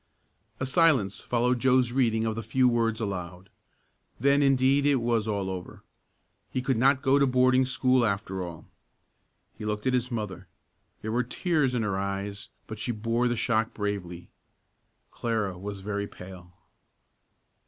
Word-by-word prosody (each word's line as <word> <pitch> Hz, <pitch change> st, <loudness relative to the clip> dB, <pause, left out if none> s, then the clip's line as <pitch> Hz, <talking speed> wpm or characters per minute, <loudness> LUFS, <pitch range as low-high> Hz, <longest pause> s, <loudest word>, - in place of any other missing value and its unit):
A 130 Hz, -, -1 dB
silence 130 Hz, -, +3 dB
followed 125 Hz, +1 st, +1 dB
Joe's 130 Hz, -1 st, +3 dB
reading 115 Hz, -3 st, +1 dB
of 110 Hz, -, 0 dB
the 115 Hz, -, -4 dB
few 125 Hz, +3 st, +2 dB
words 115 Hz, -2 st, +1 dB
aloud. 90 Hz, -3 st, -5 dB, 0.7 s
Then 140 Hz, +3 st, +3 dB
indeed 135 Hz, 0 st, +3 dB
it 145 Hz, -, +4 dB
was 115 Hz, -3 st, 0 dB
all 100 Hz, -3 st, -1 dB
over. 95 Hz, -1 st, -7 dB, 0.7 s
He -, -, -2 dB
could 130 Hz, 0 st, +1 dB
not 135 Hz, +3 st, +3 dB
go 140 Hz, +1 st, +4 dB
to 140 Hz, -, +4 dB
boarding 130 Hz, 0 st, +3 dB
school 130 Hz, -1 st, +2 dB
after 100 Hz, -3 st, -1 dB
all. 85 Hz, -3 st, -8 dB, 0.9 s
He -, -, -6 dB
looked 105 Hz, 0 st, -3 dB
at 130 Hz, -, +2 dB
his 125 Hz, 0 st, 0 dB
mother. 105 Hz, -6 st, -5 dB, 0.6 s
There 110 Hz, -, -3 dB
were 120 Hz, +2 st, +2 dB
tears 135 Hz, +1 st, 0 dB
in 115 Hz, -, 0 dB
her 100 Hz, -2 st, -1 dB
eyes 100 Hz, +1 st, -4 dB, 0.2 s
but 110 Hz, -1 st, -8 dB
she 120 Hz, -, -2 dB
bore 115 Hz, +2 st, 0 dB
the 120 Hz, -1 st, -1 dB
shock 110 Hz, -1 st, 0 dB
bravely. 95 Hz, -5 st, -4 dB, 0.8 s
Clara 110 Hz, -5 st, -2 dB
was 100 Hz, +2 st, -7 dB
very 100 Hz, 0 st, -3 dB
pale. 90 Hz, -2 st, -12 dB
115 Hz, 155 wpm, -27 LUFS, 100-130 Hz, 0.9 s, it